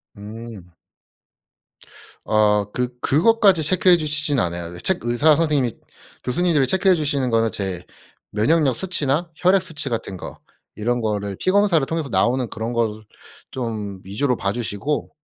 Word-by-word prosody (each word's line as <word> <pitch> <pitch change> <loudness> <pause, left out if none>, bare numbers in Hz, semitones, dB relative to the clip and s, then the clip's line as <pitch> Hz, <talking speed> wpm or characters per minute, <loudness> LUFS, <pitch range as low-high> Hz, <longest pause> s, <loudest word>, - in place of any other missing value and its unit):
음. 105 -3 -10 1.5
어 105 -1 +2
그 125 0 -1
그것까지 195 - +3
체크해 180 +2 +5
주시진 150 -3 +1
않아요. 85 -2 -3
첵 190 - +1
의사 120 +6 +3
선생님이 145 -6 +1 0.5
교수님들이 150 0 +1
체크해 190 +2 +3
주시는 145 -5 0
거는 115 -1 +1
제 95 -3 -4 0.5
면역력 135 +5 +2
수치나 165 -1 0
혈액 185 +3 +3
수치 160 -6 -3
같은 110 -5 -4
거 - - -9 0.4
이런 120 +3 -1
거를 100 -2 -2
피 185 - +1
검사를 195 -7 +3
통해서 160 -3 -3
나오는 125 +1 +1
그런 115 +2 -4
거를 110 -2 -1 0.5
좀 105 -6 -5
위주로 125 +7 -1
봐 100 -3 -2
주시고 120 +6 -3
125 Hz, 300 characters per minute, -21 LUFS, 105-160 Hz, 1.5 s, 체크해